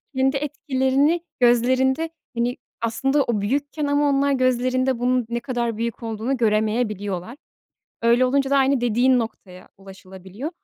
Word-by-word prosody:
kendi 265 +1 +2
etkilerini 280 +2 0 0.2
gözlerinde, 260 +5 +2 0.3
hani, 240 +1 -1 0.2
aslında 270 +5 +1
o 225 -5 -1
büyükken 285 +7 -2
ama 285 0 +2
onlar 280 0 +2
gözlerinde 255 -1 +1
bunun 250 0 +1
ne 235 0 -2
kadar 235 -3 -3
büyük 235 +1 -4
olduğunu 225 +4 -2
göremeyebiliyorlar. 215 -2 -1 0.7
Öyle 235 +2 +4
olunca 270 +1 +1
da 280 - +3
aynı 270 -1 +3
dediğin 245 +2 +3
noktaya 190 -5 -7
ulaşılabiliyor 190 - -9
250 Hz, 130 wpm, -22 LUFS, 225-270 Hz, 0.7 s, Öyle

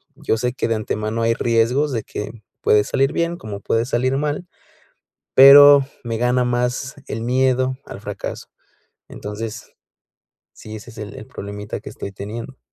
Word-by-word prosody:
yo 110 - -1
sé 125 +2 -1
que - - -2
de 115 - +1
antemano 110 +1 -2
hay 115 0 +3
riesgos 120 +6 +1
de 115 - -2
que, 105 - -6 0.3
puede 105 -1 +4
salir 135 +1 +1
bien, 170 0 0
como 105 - -7
puede 115 +2 0
salir 130 +2 0
mal, 150 +4 -2 0.9
pero 140 +1 +9 0.2
me 115 -1 -2
gana 125 +1 +2
más 125 +2 -1
el 115 - -4
miedo 130 +1 +1
al - - -9
fracaso. 105 -2 -6 0.6
Entonces, 110 +2 -7 0.9
sí, 110 - -10
ese 110 +3 -11
es 115 - -14
el 105 -1 -7
el 110 - -10
problemita 100 +1 -7
que - - -9
estoy - - -7
teniendo. 115 +6 -8
120 Hz, 160 wpm, -20 LUFS, 110-130 Hz, 0.9 s, pero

